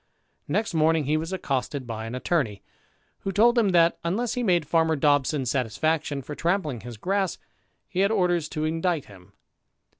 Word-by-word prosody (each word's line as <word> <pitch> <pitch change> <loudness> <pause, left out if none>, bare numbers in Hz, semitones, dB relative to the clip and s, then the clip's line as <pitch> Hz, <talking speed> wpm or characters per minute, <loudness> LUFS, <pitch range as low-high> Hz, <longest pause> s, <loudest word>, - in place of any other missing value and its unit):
Next 220 -3 -1
morning 160 0 +3
he 150 +3 +1
was 160 +3 -2
accosted 140 -6 -2
by 110 -1 -5
an 115 - -5
attorney, 125 - -1 0.6
who 195 - -3
told 230 +5 +4
him 225 -4 +3
that, 170 -2 +4
unless 215 +8 -1
he 250 - -2
made 175 -8 +2
farmer 160 +1 +2
Dobson 145 -1 +2
satisfaction 140 +4 -1
for 150 - -7
trampling 165 - -1
his 120 0 -9
grass, 190 - -1 0.5
he 185 - -4
had 200 +1 +4
orders 175 -7 +1
to 155 - -3
indict 165 -1 0
him. 95 -6 -16
160 Hz, 170 wpm, -25 LUFS, 135-180 Hz, 0.6 s, told